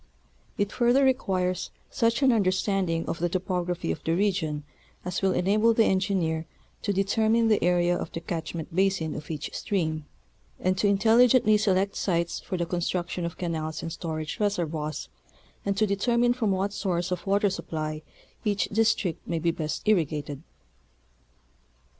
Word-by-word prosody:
It 205 0 0
further 245 +3 +3
requires 185 -8 0 0.2
such 230 +4 +1
an 265 - +6
under 210 -5 +3
standing 185 -4 0
of 165 - -3
the 175 +1 0
topography 180 - -2
of 80 - -5
the 165 - +1
region 170 -7 0 0.4
as 180 -1 -2
will 195 -1 +3
enable 215 +5 +3
the 225 - +5
engineer 185 -4 0 0.3
to 205 - -1
determine 220 +4 +2
the 215 - +3
area 175 0 +3
of 170 - -4
the - - -4
catchment 165 0 -5
basin 190 -4 +1
of 150 - -7
each 150 -2 -5
stream, 160 -7 -2 0.5
and 185 +1 +1
to 205 - +3
intelligently 225 +3 +5
select 200 -2 +1
sites 170 -2 0
for 185 - -4
the 170 - 0
construction 175 0 -2
of 170 - -5
canals 160 -3 -3
and 165 - -4
storage 155 -2 -4
reservoirs 160 -7 -1 0.6
and 200 0 0
to 215 - +4
determine 235 +4 +2
from 240 -4 -1
what 195 +1 0
source 180 -3 -1
of 180 +2 -3
water 200 0 +3
supply 155 -3 -4 0.4
each 205 -2 0
district 220 -5 +1
may 170 - -1
be 165 +1 +1
best 155 +4 -4
irrigated. 150 -7 0
185 Hz, 155 wpm, -27 LUFS, 165-205 Hz, 0.6 s, an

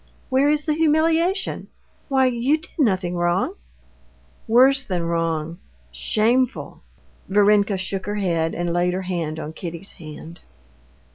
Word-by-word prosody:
"Where 270 +2 +3
is 300 0 +1
the 305 - +1
humiliation? 325 +4 +1 0.4
Why, 265 -1 +3
you 255 +4 +2
did 315 - -10
nothing 185 - +1
wrong?" 175 - 0 0.9
"Worse 265 +4 +5
than 180 -7 -2
wrong—shameful." 165 - -2 0.5
Varenka 205 0 +3
shook 190 +1 -4
her 205 - -2
head 170 -5 0
and 175 0 -2
laid 175 +1 +1
her 190 - -3
hand 165 -4 -3
on 155 0 -6
Kitty's 170 +3 -7
hand. 160 +2 -10
190 Hz, 125 wpm, -22 LUFS, 170-260 Hz, 0.9 s, Worse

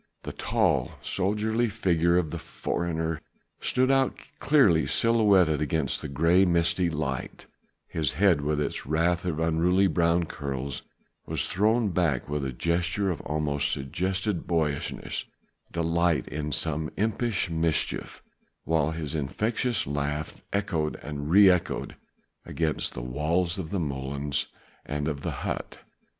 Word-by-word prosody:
The - - -6
tall - - +1
soldierly 110 +4 0
figure 85 -5 +2
of 80 -4 0
the - - -4
foreigner 80 -2 -3 0.4
stood 130 +1 +2
out 135 -1 +2 0.2
clearly 105 - +4
silhouetted 100 -9 +3
against 75 -2 0
the - - -4
grey, 85 +7 +3
misty 85 0 +2
light: 70 -5 -4 0.4
his 75 -4 -1
head 85 -2 +3
with 75 +1 0
its 75 - -2
wealth 85 +5 +1
of 80 -4 -1
unruly 85 +4 +3
brown 85 -1 +2
curls 70 -3 -4 0.5
was - - +1
thrown 110 +3 +2
back 85 -8 0
with 75 -1 -2
a 65 - -2
gesture 85 +6 0
that - - -11
almost 75 -1 0
suggested 95 - -2
boyish 80 -4 -2 0.4
delight 85 0 +1
in 75 0 -3
some 80 +2 -1
impish 110 -3 0
mischief, 80 -1 -1 0.4
whilst 80 0 +1
his 80 -2 -4
infectious 110 - 0
laugh 75 +1 -3
echoed 100 -7 -1
and 75 0 -5
re 100 +3 +7
echoed 90 -2 +1 0.5
against 80 -2 -1
the 60 - -5
walls 85 +8 0
of 80 -4 -5
the 100 - -1
molens 70 -1 -2 0.4
and 75 +1 -3
of 70 -3 -3
the - - -2 0.2
hut. - - -4
80 Hz, 135 wpm, -27 LUFS, 75-95 Hz, 0.5 s, re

